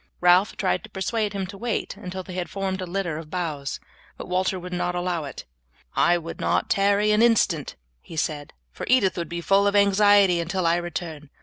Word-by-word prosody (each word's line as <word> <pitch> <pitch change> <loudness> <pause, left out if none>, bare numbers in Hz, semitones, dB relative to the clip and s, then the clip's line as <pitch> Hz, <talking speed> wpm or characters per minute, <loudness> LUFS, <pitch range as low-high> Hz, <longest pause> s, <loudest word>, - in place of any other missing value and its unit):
Ralph 180 +3 +4
tried 200 -3 0
to 220 - -11
persuade 210 +1 -2
him 195 -1 -2
to 195 +1 -10
wait 235 -1 -2
until 185 +1 -7
they 185 - -9
had 180 -1 -3
formed 195 -1 -3
a 185 - -4
litter 175 -4 -2
of 155 -2 -10
boughs, 155 -6 -3 0.4
but - - -8
Walter 185 +1 0
would 180 0 -8
not 180 0 -1
allow 175 -3 -2
it. 140 - -8 0.5
"I 175 0 +4
would 165 -1 -7
not - - 0
tarry 200 +1 +3
an 210 +1 +3
instant," 205 -10 +2 0.3
he - - -11
said, 150 -2 -2 0.2
"for - - -7
Edith 245 -7 +4
will 170 - -3
be 170 +1 -5
full 195 +3 +3
of 200 - +1
anxiety 200 -2 +5
until 175 +2 -2
I 165 +1 +3
return. 170 -4 -5
185 Hz, 205 wpm, -24 LUFS, 170-200 Hz, 0.5 s, anxiety